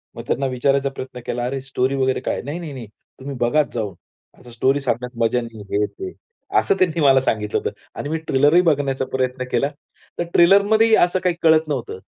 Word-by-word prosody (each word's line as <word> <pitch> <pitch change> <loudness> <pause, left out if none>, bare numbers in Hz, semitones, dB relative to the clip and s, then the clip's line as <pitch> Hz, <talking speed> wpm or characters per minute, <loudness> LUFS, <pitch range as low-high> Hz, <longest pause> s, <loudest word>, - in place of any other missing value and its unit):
मग - - -7
त्यांना 135 +2 0
विचारायचा 135 +2 +1
प्रयत्न 130 -2 -8
केला 120 0 -2
अरे 135 +1 -3
स्टोरी 135 0 -1
वगैरे 130 -1 +1
काय? - - -2
नाही-नाही-नाही 145 -6 -6 0.3
तुम्ही 135 +1 -6
बघाच 145 +5 +1
जाऊन 105 -6 -3 0.5
असं 125 - -14
स्टोरी 135 +4 +1
सांगण्यात 125 -2 -3
मजा 125 +2 +1
नाही 115 -2 -9 0.2
हे, 105 - +2
ते. 380 - -8 0.5
असं - - +1
त्यांनी 170 -3 +1
मला 135 -2 +5
सांगितलं 105 -5 -1
होतं. - - -2 0.3
आणि 145 - -4
मी 160 - -1
ट्रेलरही 145 +6 +4
बघण्याचा 140 -5 +1
प्रयत्न 130 0 -1
केला, 140 +4 +1 0.5
तर - - +2
ट्रेलरमध्येही 205 +5 +5
असं 180 +1 +3
काही 180 -2 0
कळत 160 -1 +4
नव्हतं. 130 -9 -4
135 Hz, 185 wpm, -21 LUFS, 125-160 Hz, 0.5 s, मला